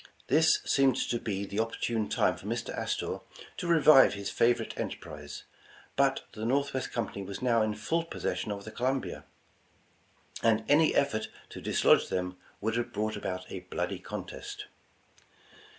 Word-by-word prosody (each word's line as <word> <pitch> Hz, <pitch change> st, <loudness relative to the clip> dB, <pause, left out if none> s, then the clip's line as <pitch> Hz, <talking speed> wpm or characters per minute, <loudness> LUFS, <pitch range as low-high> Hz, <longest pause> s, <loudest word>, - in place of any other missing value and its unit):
This 160 Hz, +1 st, +5 dB
seemed 135 Hz, -3 st, +4 dB
to 120 Hz, -, -1 dB
be 100 Hz, -3 st, -3 dB
the 100 Hz, +2 st, -4 dB
opportune 115 Hz, -1 st, -1 dB
time -, -, +2 dB
for -, -, -10 dB
Mr. -, -, -3 dB
Astor -, -, -2 dB, 0.4 s
to 175 Hz, -, -3 dB
revive 155 Hz, -8 st, +7 dB
his 100 Hz, 0 st, -4 dB
favorite 120 Hz, +1 st, +2 dB
enterprise, 75 Hz, -1 st, -6 dB, 0.5 s
but -, -, +2 dB
the 110 Hz, -, -7 dB
Northwest 130 Hz, +1 st, 0 dB
Com 115 Hz, -3 st, -1 dB
pany 100 Hz, -, -6 dB
was 100 Hz, +4 st, -7 dB
now 115 Hz, -3 st, +3 dB
in 110 Hz, -1 st, 0 dB
full 160 Hz, +11 st, 0 dB
possession 115 Hz, -8 st, -3 dB
of 100 Hz, -1 st, -5 dB
the 110 Hz, -, -7 dB
Columbia, 130 Hz, +3 st, -2 dB, 1.2 s
and 110 Hz, -1 st, +3 dB
any 155 Hz, +2 st, +4 dB
effort 110 Hz, -6 st, +1 dB, 0.2 s
to -, -, -9 dB
dislodge -, -, +4 dB
them, 90 Hz, 0 st, -2 dB, 0.2 s
would 110 Hz, +2 st, 0 dB
have 120 Hz, 0 st, -2 dB
brought 110 Hz, 0 st, -1 dB
about 90 Hz, 0 st, -4 dB
a 95 Hz, -, -4 dB
bloody 90 Hz, 0 st, -3 dB
contest. -, -, -7 dB
115 Hz, 155 wpm, -30 LUFS, 100-135 Hz, 1.2 s, revive